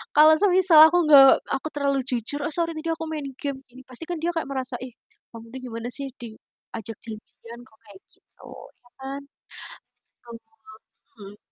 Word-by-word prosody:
kalau 305 +1 +7
semisal 370 -4 +4
aku 350 +2 +1
nggak 275 -3 +8 0.2
aku 270 +3 -3
terlalu 280 -1 -1
jujur, 250 +3 -1
"Oh, - - -3
sorry 335 -1 0
tadi 330 +1 -5
aku 325 0 -6
main 300 -3 -5
game," 280 -2 -4 0.3
pasti 255 +6 -8
kan 350 - -3
dia 345 +1 -1
kayak 325 - -3
merasa, 260 -2 -4
"Ih 255 -2 -9 0.4
kamu 230 0 -11
tuh 260 - -7
gimana 230 0 -6
sih, 275 +3 -2
diajak 225 -1 -10
janjian 230 +1 -11
kok 220 -3 -26
kayak 200 -2 -16
gitu." - - -20 0.4
Ya 245 - -24
kan? 270 +1 -6 1.1
Mhm 235 - -9 0.8
mhm. 205 -2 -13
270 Hz, 165 wpm, -23 LUFS, 230-310 Hz, 1.1 s, nggak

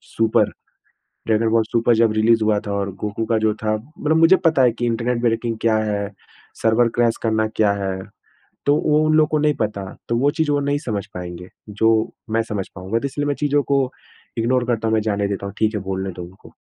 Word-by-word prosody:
Super. 115 -1 +2 0.8
Dragon 110 0 +2
ball 115 0 +3
super 120 0 +3
जब 115 -1 +3
release 110 +1 +3
हुआ 105 -1 +2
था 100 - -3
और 100 -1 -2
गोकु 105 +1 -2
का 115 -1 +1
जो 110 -1 +1
था, 110 0 -1
मतलब 150 +6 -2
मुझे 165 +3 +6
पता 160 -5 +4
है 125 -2 +4
कि 120 +1 -3
इंटरनेट 120 +1 -1
ब्रेकिंग 115 -1 0
क्या 115 -1 +3
है, 105 -2 -1 0.5
सर्वर 115 +1 +3
क्रैश 120 -1 +2
करना 110 -1 +1
क्या 105 -2 +3
है? 95 -1 -2 0.7
तो 145 - +4
वो 150 0 +4
उन 155 - +2
लोगों 155 -1 +5
को 155 - +1
नहीं 150 0 +2
पता, 105 -2 -2 0.3
तो 115 - +1
वो 140 +4 +3
चीज़ 160 -1 0
वो 145 - +2
नहीं 140 0 0
समझ 110 -8 -3
पाएँगे, 90 0 -7 0.2
जो 110 +2 +2 0.4
मैं 115 +1 +2
समझ 100 -3 -3
पाऊँगा 95 +5 -2
तो 140 - -2
इसलिए 145 +1 -3
मैं 145 - 0
चीज़ 145 -1 0
को 140 -1 +3 0.6
इग्नोर 120 +2 +1
करता 115 -2 0
हूँ 110 - +1
मैं 110 - +2
जाने 100 -1 0
देता 100 0 -4
हूँ, 100 - -7
ठीक 110 0 +1
है 105 - -2
बोलने 95 0 -3
दो 90 - -9
उनको। 90 +3 -14
115 Hz, 225 wpm, -21 LUFS, 105-125 Hz, 0.8 s, मुझे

